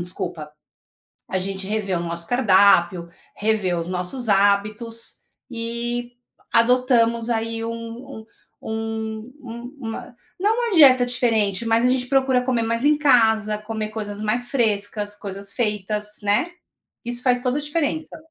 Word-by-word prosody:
desculpa, 175 -3 -6 0.8
a 190 - -1
gente 190 +1 -4
reviu 200 -4 -1
o - - -3
nosso 170 0 -3
cardápio, 190 -7 +4 0.3
reviu 205 -5 0
os 165 - -3
nossos 185 +7 -2
hábitos 210 +3 +1 0.3
e, 240 +1 -4 0.4
adotamos 235 -1 +3
aí 225 0 -2
um - - -3
um 230 +1 -9 0.3
um 220 +1 -5
um 245 +2 -9
uma 230 +1 -7 0.2
não 420 +3 +2
uma 475 -4 -1
dieta 255 -6 +7
diferente, 225 -4 +1
mas 225 +1 +2
a - - +4
gente 255 -1 0
procura 265 -2 +2
comer 250 -3 0
mais 230 +3 -1
em 300 0 +4
casa, 220 -6 +3
comer 215 0 -5
coisas 205 -1 -4
mais 230 +3 0
frescas, 210 -4 0
coisas 200 -1 -5
feitas, 210 -2 -1
né. 205 +12 +1 0.5
Isso 240 +1 -2
faz 250 -1 +3
toda 255 +2 0
a - - -2
diferença. 305 +1 -2
225 Hz, 140 wpm, -22 LUFS, 205-245 Hz, 0.8 s, dieta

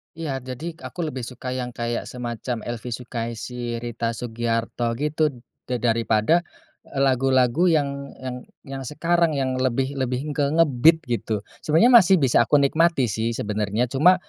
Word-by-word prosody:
Iya, 155 -5 -3
jadi 130 +7 -6 0.2
aku 180 - -13
lebih 125 -3 -5
suka 125 0 -6
yang 125 -1 -4
kayak 120 0 -3
semacam 120 -1 -5
Elvy 120 0 -5
Sukaesih, 120 0 -5
Rita 115 0 -3
Sugiarto 115 0 -2
gitu, 150 +3 +1 0.4
da 125 - -1
daripada 115 +4 +2 0.6
lagu-lagu 135 +3 +3
yang 140 -4 0
yang 125 -1 -4 0.3
yang 135 -1 -6
sekarang 165 +1 +1
yang 130 -1 -1
lebih 130 +1 0
lebih 130 +3 -2
ke 145 -1 +1
nge-beat 160 +1 +4
gitu, 110 -5 -2 0.2
sebenarnya 165 +11 +4
masih 190 0 +5
bisa 125 -7 +3
aku - - +3
nikmati 140 -3 +3
sih 115 +2 -1
sebenarnya 105 +3 -1
cuma 155 +7 +5
130 Hz, 145 wpm, -23 LUFS, 120-145 Hz, 0.6 s, masih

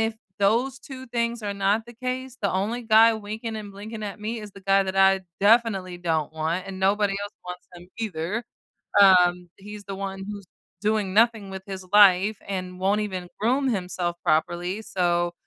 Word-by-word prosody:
if 225 0 0 0.2
those 235 +6 +2
2 260 -1 -10
things 235 -1 -2
are 205 - -2
not 200 +3 +1
the 240 - -12
case, 255 +1 -5
the 200 - +1
only 210 +6 -1
guy 225 0 +6
winking 220 +1 -5
and 205 -2 -8
blinking 215 +2 -8
at 205 -1 -5
me 220 +2 -4
is 210 -1 -10
the 195 - -13
guy 195 +1 +4
that 190 0 -4
I 195 0 +5 0.2
definitely 200 -4 +2
don't 160 -3 -1
want, 165 +4 -2
and 190 -1 -7
nobody 200 +1 +2
else 205 +1 -7
wants 180 0 -8
him 175 +1 -14
either, 205 +1 -3 0.6
um, 180 -2 +5
he's 205 +1 -10
the 195 - -6
one 195 0 -5
who's 200 -2 -7 0.4
doing 210 -3 0
nothing 225 -2 +3
with 190 0 -7
his 190 -1 -7
life 205 0 +6
and 185 -2 -5
won't 200 +3 +1
even 185 -4 -4
groom 260 +5 +2
himself 180 -3 -2
properly, 175 +6 0
so, 175 -4 0
200 Hz, 180 wpm, -25 LUFS, 185-220 Hz, 0.6 s, guy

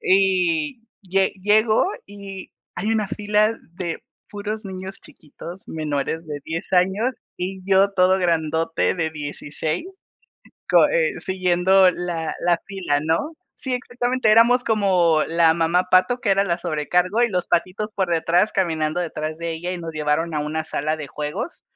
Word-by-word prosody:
Y 185 0 +2 0.2
lle 190 0 +1
llego 215 - +4 0.2
y 200 -2 -8 0.2
hay 210 - -2
una 215 -3 0
fila 210 +1 +1 0.2
de 170 -3 -4 0.3
puros 210 +1 -5
niños 190 0 -7
chiquitos 170 +3 -11
menores 155 +1 -3
de 145 -1 -5
10 165 +3 -4
años 190 +7 +2 0.2
y 190 +1 -4
yo 195 +1 +5
todo 185 0 +3
grandote 165 -2 +1
de 165 -3 -1
16 155 - -4 0.9
co - - +6
e - - 0
siguiendo 185 0 +3
la 170 -2 -4
la 175 -1 +2
fila 180 -7 -1
¿no? 165 - 0 0.2
Sí, 260 -2 -3
exactamente, 245 -1 0
éramos 235 +3 +5
como 185 -7 +3
la 165 -1 +4
mamá 170 +2 +2
pato, 215 +7 +4
que 205 - 0
era 195 0 +4
la 175 -3 0
sobrecargo 180 +6 0
y 240 - +3
los 180 -4 -2
patitos 185 +5 -1
por 190 -3 0
detrás, 170 +5 +2
caminando 160 -3 0
detrás 155 -2 -4
de 170 0 -3
ella 175 +3 -4
y 180 - -4
nos 165 -1 -6
llevaron 155 +2 -1
a 150 - 0
una 155 +1 -3
sala 155 0 -2
de 150 -2 -6
juegos 150 - -5
180 Hz, 155 wpm, -22 LUFS, 160-200 Hz, 0.9 s, co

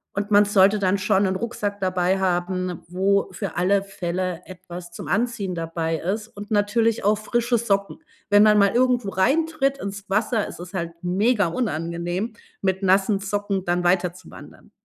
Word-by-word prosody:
Und 205 +1 -2
man 205 0 +6
sollte 200 0 +4
dann 195 +1 +1
schon 195 +1 +2
'n 190 0 0
Rucksack 205 -2 -3
dabei 185 0 +1
haben, 180 -1 -1
wo 195 +3 +1
für 195 -6 -5
alle 195 +2 +3
Fälle 180 -2 -3
etwas 175 -1 -10
zum - - -8
Anziehen 215 -4 -1
dabei 165 0 -2
ist 210 +7 -3
und 205 +1 -10
natürlich 220 +2 +1
auch 205 +1 +3
frische 235 +2 0
Socken. 200 -3 -1 0.3
Wenn 205 +1 +6
man 210 -1 +5
mal 200 -1 +4
irgendwo 245 -4 +2
reintritt 275 - +1
ins 200 0 -6
Wasser, 215 +1 +1
ist - - -10
es 180 +2 -9
halt 170 -2 -3
mega 200 +3 +2
unangenehm, 175 +1 -3 0.3
mit 190 0 -1
nassen 195 +2 +3
Socken 200 -1 -2
dann 175 0 0
weiterzuwandern. 180 0 -3
195 Hz, 160 wpm, -23 LUFS, 180-210 Hz, 0.3 s, man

